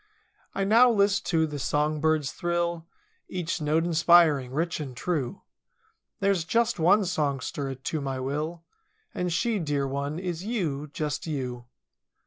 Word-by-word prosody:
I 195 Hz, -, 0 dB
now 230 Hz, +5 st, +6 dB
list 200 Hz, -3 st, +2 dB
to 160 Hz, -3 st, +2 dB
the 150 Hz, -2 st, -5 dB
song 150 Hz, +3 st, 0 dB
bird's 155 Hz, -2 st, +1 dB
thrill. 170 Hz, -1 st, -2 dB, 0.4 s
Each 175 Hz, -2 st, -3 dB
note 155 Hz, +2 st, +1 dB
inspiring, 165 Hz, -6 st, +4 dB
rich 160 Hz, +4 st, -1 dB
and 135 Hz, -5 st, -6 dB
true— 150 Hz, -7 st, -2 dB, 0.8 s
There's 195 Hz, -3 st, +2 dB
just 230 Hz, +5 st, +1 dB
one 195 Hz, +5 st, +4 dB
songster 140 Hz, -4 st, -2 dB
to 140 Hz, +4 st, -4 dB
my 135 Hz, -1 st, -3 dB
will. 150 Hz, +6 st, -3 dB, 0.5 s
And 180 Hz, -1 st, -2 dB
she, 220 Hz, +5 st, 0 dB
dear 145 Hz, -4 st, -1 dB
one, 140 Hz, +3 st, -3 dB
is 175 Hz, -1 st, -4 dB
you, 160 Hz, -, -2 dB
just 150 Hz, -1 st, -3 dB
you. 125 Hz, -5 st, -4 dB
160 Hz, 140 wpm, -27 LUFS, 145-180 Hz, 0.8 s, now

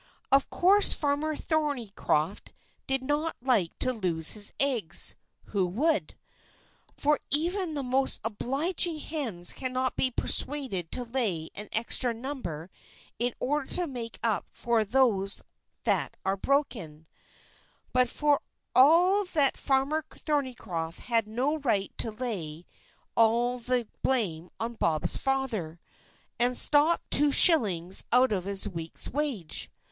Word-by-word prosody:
Of 275 Hz, 0 st, +3 dB
course 400 Hz, +3 st, +4 dB
Farmer 295 Hz, +1 st, -2 dB
Thornycroft 240 Hz, -, -2 dB, 0.4 s
did 270 Hz, -1 st, 0 dB
not 295 Hz, +4 st, -2 dB
like 235 Hz, -10 st, 0 dB
to 255 Hz, -, 0 dB
lose 170 Hz, -8 st, +1 dB
his 210 Hz, -1 st, +3 dB
eggs 240 Hz, -11 st, +3 dB, 0.3 s
who 195 Hz, -3 st, -2 dB
would? 300 Hz, -, -1 dB, 0.8 s
for 295 Hz, +1 st, +1 dB
even 340 Hz, +2 st, +1 dB
the 280 Hz, -, -3 dB
most 265 Hz, +1 st, 0 dB
obliging 295 Hz, -, 0 dB
hens 250 Hz, -, 0 dB
cannot 255 Hz, -1 st, -2 dB
be 260 Hz, -, +1 dB
persuaded 255 Hz, -, +2 dB
to 250 Hz, -, -4 dB
lay 225 Hz, -10 st, -2 dB
an 210 Hz, +1 st, -8 dB
extra 235 Hz, +1 st, 0 dB
number 225 Hz, -, -7 dB, 0.5 s
in 240 Hz, 0 st, -1 dB
order 290 Hz, +1 st, -2 dB
to 360 Hz, -, -1 dB
make 240 Hz, -6 st, -7 dB
up 225 Hz, -3 st, 0 dB
for 235 Hz, -2 st, -1 dB
those 210 Hz, -4 st, 0 dB, 0.4 s
that -, -, -1 dB
are 195 Hz, -, 0 dB
broken; 200 Hz, -, -2 dB, 0.9 s
but 250 Hz, -1 st, +2 dB
for 295 Hz, +1 st, 0 dB, 0.3 s
all 350 Hz, +9 st, +5 dB
that 295 Hz, -7 st, +2 dB
Farmer 280 Hz, +3 st, 0 dB
Thornycroft 225 Hz, -, -4 dB
had 230 Hz, -3 st, -1 dB
no 260 Hz, +8 st, -2 dB
right 215 Hz, -8 st, -2 dB
to 230 Hz, -, -1 dB
lay 190 Hz, -9 st, -6 dB, 0.5 s
all 235 Hz, +2 st, +2 dB
the 245 Hz, -1 st, -1 dB
blame 180 Hz, -10 st, 0 dB
on 230 Hz, +1 st, -4 dB
Bob's 155 Hz, -6 st, 0 dB
father, 235 Hz, -, -3 dB, 0.6 s
and 245 Hz, +1 st, +3 dB
stop 305 Hz, +3 st, +5 dB
two 290 Hz, +1 st, +5 dB
shillings 195 Hz, -, +6 dB
out 250 Hz, +1 st, +4 dB
of 190 Hz, -3 st, -2 dB
his 200 Hz, +1 st, +2 dB
week's 165 Hz, -4 st, -6 dB
wage. 255 Hz, -, -3 dB
250 Hz, 125 wpm, -27 LUFS, 200-285 Hz, 0.9 s, shillings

